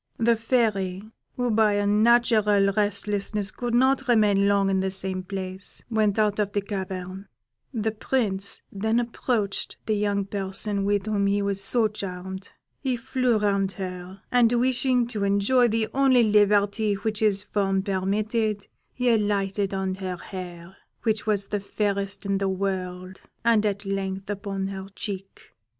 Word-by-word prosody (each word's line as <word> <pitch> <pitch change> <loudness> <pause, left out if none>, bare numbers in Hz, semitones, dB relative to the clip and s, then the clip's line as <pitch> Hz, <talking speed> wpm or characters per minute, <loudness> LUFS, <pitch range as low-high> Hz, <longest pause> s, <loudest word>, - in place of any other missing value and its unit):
The 230 0 +3
Fairy, 215 -5 0 0.3
who 245 -1 0
by 215 -1 +3
a 205 0 +1
natural 210 -2 +4
restlessness 205 0 -1
could 240 -1 -2
not 265 +2 +3
remain 205 -4 +4
long 200 -1 +3
in 190 - +2
the 190 0 0
same 190 0 -3
place, 190 0 -6
went 215 -2 +2
out 210 -1 +2
of 205 -1 0
the 205 - +1
cavern; 190 -1 -5 0.4
the 220 -3 -1
Prince 210 -3 -1
then 220 +4 0
approached 230 -3 -1
the 215 - +1
young 205 -1 0
person 195 +1 -2
with 205 0 +1
whom 205 -2 +1
he 200 0 +1
was 200 -1 +2
so 230 +2 +2
charmed; 190 -2 -7 0.3
he 260 -3 -1
flew 245 0 +1
round 200 -2 +1
her, 185 0 -7
and 240 -2 +4
wishing 250 0 +2
to 220 -4 -2
enjoy 200 +6 +3
the 225 -1 0
only 265 -3 +4
liberty 205 0 +3
which 215 +1 -2
his 205 -2 +2
form 195 -2 0
permitted, 205 +2 -1 0.3
he 250 0 -1
alighted 200 -2 0
on 190 -1 -1
her 185 -1 -4
hair, 180 -1 -9 0.3
which 220 -2 0
was 200 -2 0
the 205 - -1
fairest 200 0 -2
in 195 0 0
the 195 -1 0
world, 185 -1 -3 0.2
and 220 -2 +4
at 200 0 -3
length 195 0 -3
upon 195 -1 -3
her 190 0 -6
cheek. 195 -2 -7
205 Hz, 155 wpm, -25 LUFS, 195-220 Hz, 0.4 s, natural